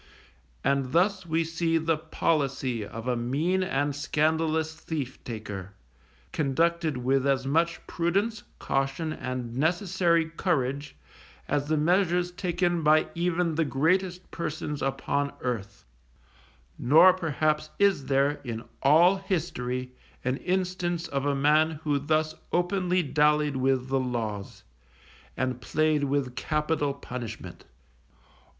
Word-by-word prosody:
And 135 -1 +1
thus 190 +1 +2
we 165 +1 +1
see 165 0 0
the 165 0 +1
policy 140 -6 -1
of 115 +3 -7
a 125 - +1
mean 145 +11 0
and 145 -5 0
scandalous 160 +2 0
thief 150 -4 -5
taker, 105 -4 -6 0.6
conducted 160 +1 +1
with 135 +2 +1
as 135 -1 +1
much 165 +4 0
prudence, 200 +6 0 0.2
caution, 135 +4 -1
and 125 -3 -5
necessary 170 +2 +2
courage, 145 -5 -1 0.5
as 145 0 0
the 155 0 +1
measures 175 +2 +2
taken 175 -1 0
by 155 0 +4
even 175 0 0
the 165 +1 +1
greatest 180 +6 0
persons 150 -3 -4
upon 140 +1 -1
earth; 115 -6 -4 0.9
nor 165 +8 +7
perhaps 155 -3 0
is 195 -9 +2
there, 140 +1 +2
in 115 -3 -5 0.2
all 170 +7 +6
history, 130 -10 -3 0.3
an 130 +1 0
instance 180 -2 -1
of 140 -1 -1
a 140 - +1
man 150 +2 +3
who 145 -2 +1
thus 155 +2 0 0.2
openly 180 0 +1
dallied 150 0 +2
with 130 0 +1
the 135 0 +2
laws, 115 -6 -4 0.7
and 130 -1 -2
played 155 +4 +1
with 135 -3 -1
capital 150 +1 0
punishment. 125 -4 -7
150 Hz, 120 wpm, -27 LUFS, 135-170 Hz, 0.9 s, nor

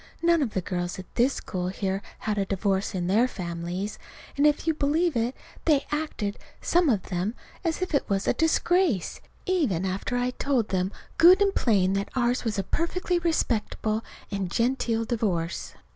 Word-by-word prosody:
None 340 -1 +4
of 245 -7 -2
the 190 - +1
girls 175 -1 -3
in 185 - -7
this 250 +3 +2
school 180 -1 -3
here 190 +1 -2 0.2
had 210 -1 -2
a 195 - +1
divorce 195 0 0
in 180 -1 -1
their 215 +7 +3
families; 175 0 -4 0.4
and, 285 +1 +4
if 295 +1 +1
you'll 320 -1 +2
believe 310 +2 +1
it, 235 +2 0 0.3
they 295 -4 +3
acted 295 -9 -2 0.2
some 345 -2 +3
of 210 -7 +2
them 185 +5 -1 0.3
as 335 +1 0
if 370 - -4
it 285 - +1
was 195 -1 0
a - - +4
disgrace, 325 - +1 0.2
even 280 - +1
after 190 +6 -2
I 245 +1 0
told 255 -4 0
them 185 0 0 0.3
good 360 +3 +8
and 400 -1 +3
plain 195 -5 +2
that 195 0 -1
ours 245 0 +1
was 225 -4 -1
a 195 - 0
perfectly 350 - 0
respectable 225 -9 0 0.3
and 195 -3 -2
genteel 230 0 0
divorce. 190 -8 -2
225 Hz, 175 wpm, -26 LUFS, 190-300 Hz, 0.4 s, good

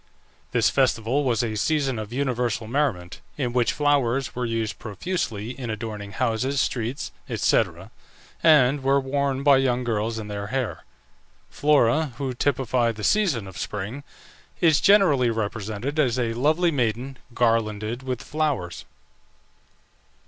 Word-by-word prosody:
This - - +3
festival 130 0 +1
was 120 -3 +1
a 115 -2 -2
season 135 +1 0
of 110 0 -6
universal 125 -4 -1
merriment, 110 - -2 0.2
in 125 -4 -2
which 125 -1 +2
flowers 140 -3 +1
were 125 -1 -2
used 115 -2 -2
profusely 110 - -3
in 125 -3 -6
adorning 105 -2 -5
houses, 125 +3 0
streets, 120 +3 -2 0.2
&c., - - +3 0.8
and 145 -3 +5
were 135 +1 +3
worn 140 0 -1
by 140 -2 +6
young 125 -2 +1
girls 110 -1 -1
in 110 -1 -5
their 100 -1 -5
hair. 110 -10 -3 0.7
Flora, 145 0 +2
who 135 -2 -3
typified 125 -3 0
the 105 - -8
season 170 - +2
of 95 -5 -9
Spring, 105 - -5 0.6
is 160 -3 +4
generally 180 - +5
represented 110 +5 -3
as 130 -5 +2
a 115 -2 0
lovely 155 +8 +2
maiden, 125 0 -1 0.2
garlanded 115 0 0
with 130 -2 -4
flowers. 145 - -2
125 Hz, 135 wpm, -24 LUFS, 110-140 Hz, 0.8 s, by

